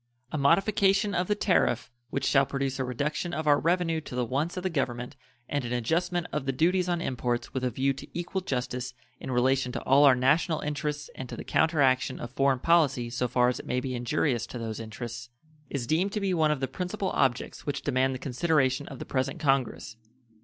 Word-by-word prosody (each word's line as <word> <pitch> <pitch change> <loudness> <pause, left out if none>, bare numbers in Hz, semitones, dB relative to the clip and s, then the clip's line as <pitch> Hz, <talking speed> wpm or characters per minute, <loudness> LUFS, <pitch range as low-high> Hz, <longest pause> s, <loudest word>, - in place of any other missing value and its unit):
A - - -2
modification 195 +6 +3
of 180 -1 0
the 210 - +2
tariff 175 - +1 0.2
which - - -2
shall 135 -1 +4
produce 135 -1 -2
a - - +1
reduction 145 +7 -2
of 155 - -3
our 145 -1 +5
revenue 165 -1 +1
to 130 - -8
the 125 -1 0
wants 145 +9 -2
of 180 - -3
the 185 - 0
Government 125 -4 -2 0.3
and 145 -2 -1
an 120 0 -3
adjustment 170 +8 0
of 145 -2 -3
the - - +2
duties 180 +6 +2
on 175 -1 0
imports 120 -4 -2
with 130 -1 -2
a 125 - +2
view 135 +3 0
to 140 +2 -10
equal 180 +2 -3
justice 125 -4 -3 0.2
in - - -7
relation 130 +1 +2
to - - -3
all 140 +2 +5
our 135 -2 +7
national 150 +6 +2
interests 150 0 -3
and 130 -2 -7
to - - -5
the - - -6
counteraction 135 -5 +2
of 120 - -6
foreign 135 +1 +2
policy 140 -6 +2
so 125 +1 -1
far 125 +1 +3
as 125 - 0
it - - -10
may 125 - 0
be 130 0 -4
injurious 120 0 0
to - - -7
those 115 -2 -4
interests, 120 +2 -7 0.4
is 135 -4 -3
deemed 170 +8 +1
to 210 - 0
be 195 -2 0
one 160 -3 +3
of 150 -3 0
the 135 - 0
principal 185 +7 -3
objects 130 0 -1
which 145 -1 -2
demand 130 -1 +1
the - - -3
consideration 135 0 +1
of 135 - -8
the - - -7
present 135 +4 -2
Congress. 135 -6 0
135 Hz, 215 wpm, -28 LUFS, 125-165 Hz, 0.4 s, our